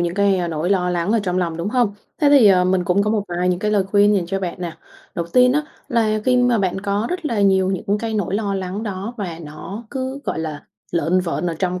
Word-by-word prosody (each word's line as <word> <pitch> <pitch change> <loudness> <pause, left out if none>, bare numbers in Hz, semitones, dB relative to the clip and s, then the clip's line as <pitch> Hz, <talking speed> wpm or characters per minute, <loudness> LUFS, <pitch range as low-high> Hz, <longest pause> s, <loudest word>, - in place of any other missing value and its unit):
những 175 0 -1
cái, 200 0 +3
a, 175 -2 -1
nỗi 165 +2 -2
lo 180 -2 +2
lắng 175 +3 0
ở 230 - +3
trong 180 -2 -1
lòng, 170 -3 -1
đúng 170 +4 -3
hông? 235 -3 +1 0.3
Thế 295 - +5
thì, 275 -6 +7
ờ, 185 -2 +5
mình 185 0 +1
cũng 180 +3 +2
có 210 - 0
một 215 -2 +1
vài 175 +1 -1
những 180 -1 +1
cái 210 +3 -1
lời 205 -2 +2
khuyên 205 +1 +4
dành 185 -4 0
cho 195 +2 -2
bạn 180 -1 -4
nè, 170 -3 -5 0.4
đầu 170 - -2
tiên 250 +8 +4
á, 300 +2 +1 0.3
là 220 -4 +1
khi 255 -1 +3
mà 245 -2 +3
bạn 190 -1 -1
có 205 +3 -1
rất 360 -1 -3
là 230 -8 0
nhiều 190 -1 +3
những 195 +2 -1
cái 225 0 -3
nỗi 195 -3 -1
lo 200 -1 -1
lắng 190 +2 -4
đó 205 +2 -5
và 180 -7 -5
nó 170 +9 -8
cứ, 265 0 -4
gọi - - -2
là, 155 -2 -4 0.3
lởn 170 +2 +2
vởn 175 -1 -2
ở 170 - -1
trong 180 0 -1
195 Hz, 270 wpm, -20 LUFS, 180-215 Hz, 0.4 s, thì